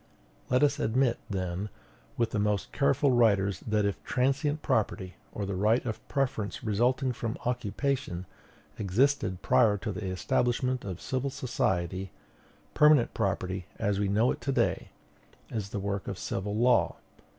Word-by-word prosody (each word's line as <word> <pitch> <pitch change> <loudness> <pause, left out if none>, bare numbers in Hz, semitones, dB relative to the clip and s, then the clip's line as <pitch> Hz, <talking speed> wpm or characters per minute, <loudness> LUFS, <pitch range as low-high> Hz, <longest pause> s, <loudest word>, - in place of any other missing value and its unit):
Let 125 +3 +3
us 145 0 +3
admit, 120 0 +2
then, 95 0 -3 0.5
with 115 -2 +1
the 105 - -1
most 105 -1 0
careful 130 - +2
writers, 100 -6 +3
that 105 -1 +2
if 100 -3 -2
transient 135 +5 0
property, 95 -4 0 0.2
or 100 - -4
the 100 - -3
right 105 +7 +2
of 110 -3 -4
preference 125 -7 -2
resulting 125 +5 +1
from 115 -1 -4
occupation, 125 -5 -1 0.5
existed 105 -1 +1
prior 105 -2 +4
to 105 +2 -4
the 95 0 -4
establishment 120 +7 0
of 95 -4 -5
civil 130 +1 -2
society, 95 - -1 0.6
permanent 150 -5 +5
property, 90 0 -2
as 100 -1 0
we 100 - +1
know 110 +5 +3
it - - -5
to 140 - -1
day, 120 -4 0 0.6
is 105 -4 -3
the 105 - -4
work 100 0 -3
of - - -4
civil 100 +2 -3
law. 120 +2 +3
110 Hz, 150 wpm, -29 LUFS, 100-125 Hz, 0.6 s, permanent